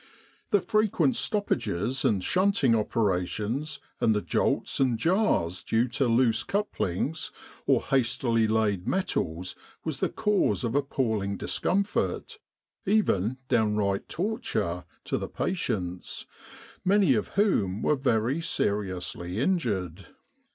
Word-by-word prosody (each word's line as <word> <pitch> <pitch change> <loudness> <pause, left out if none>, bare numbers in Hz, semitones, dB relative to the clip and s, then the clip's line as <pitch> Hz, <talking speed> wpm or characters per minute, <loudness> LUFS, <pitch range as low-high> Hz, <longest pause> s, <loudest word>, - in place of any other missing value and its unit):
The 205 - +3
frequent 220 +3 +2
stoppages 120 - -1
and 100 -4 +2
shunting 185 - +3
opera 105 -4 +1
tions, 135 - -3 0.2
and 110 -2 +3
the 105 - +1
jolts - - 0
and 130 -4 +2
jars 165 - +1
due 115 +2 +1
to 125 +2 0
loose 115 -1 +3
couplings 160 - -2 0.4
or - - +3
hastily 120 -3 +1
laid 105 -4 +1
1 - - -1
metals 90 - -1 0.3
was - - -3
Ihe - - -1
cause 210 -9 +1
of 120 -1 -1
appalling 115 -8 0
discomfort, 200 - -1 0.4
even 130 - +2
downright 105 -4 +1
torture, 160 - -2 0.2
to - - -2
the - - -5
patients, 90 - -3 0.6
many 190 -5 +4
of 105 -4 0
whom 105 - +2
were 150 - +3
very 130 +2 +1
seriously 95 - -2
injured. 100 - -1
115 Hz, 115 wpm, -27 LUFS, 100-165 Hz, 0.6 s, many